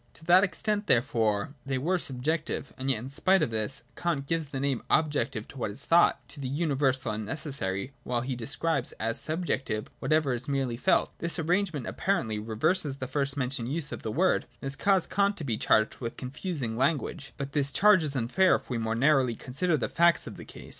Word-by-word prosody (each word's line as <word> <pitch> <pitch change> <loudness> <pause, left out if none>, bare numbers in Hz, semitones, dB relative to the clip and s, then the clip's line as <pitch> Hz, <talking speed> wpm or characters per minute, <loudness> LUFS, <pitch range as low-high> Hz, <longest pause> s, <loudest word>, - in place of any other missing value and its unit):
To 160 - -14
that 180 +3 +6
extent 210 +1 -1
therefore, 115 -1 +1
they 135 -1 -2
were 175 +8 0
subjective. 150 0 -2
And 130 +1 -3
yet 130 - +2
in 125 +5 -7
spite 190 +7 +3
of - - -1
this, 110 +3 -3
Kant 165 -6 -1
gives 165 +1 -1
the 135 - -4
name 135 -3 0
objective 145 -8 +1
to 135 - -10
what 115 - -1
is 105 +7 -9
thought, 170 +1 +4
to 145 - -12
the 135 - -3
universal 135 -4 0
and 110 0 -3
necessary, 110 -4 -3
while 120 -1 -1
he 130 +1 -3
describes 140 +3 -1
as 115 +1 -2
subjective 145 -9 -2
whatever 155 -4 +2
is 125 +3 -3
merely 135 -4 0
felt. 185 +10 +2
This 170 +1 -1
arrangement 170 - 0
apparently 110 - -1
reverses 135 - 0
the 130 - -5
first 140 +1 -2
mentioned 130 -2 -2
use 150 -2 -2
of - - -5
the 110 - -3
word, 180 - +2
and - - -9
has - - -3
caused 195 +4 +2
Kant 200 +1 +2
to - - -6
be 120 -6 -1
charged 110 0 +2
with 115 -2 -5
confusing 130 -3 -4
language. 140 +2 -1
But 140 -1 -4
the 145 -1 +2
charge 185 +6 +5
is 145 -2 -2
unfair 135 +10 +3
if - - -6
we 120 - -1
more 110 0 -1
narrowly 130 -1 +3
consider 155 +8 0
the 125 - -1
facts 170 0 +3
of - - -8
the - - -9
case. - - -12
140 Hz, 210 wpm, -28 LUFS, 120-165 Hz, -, that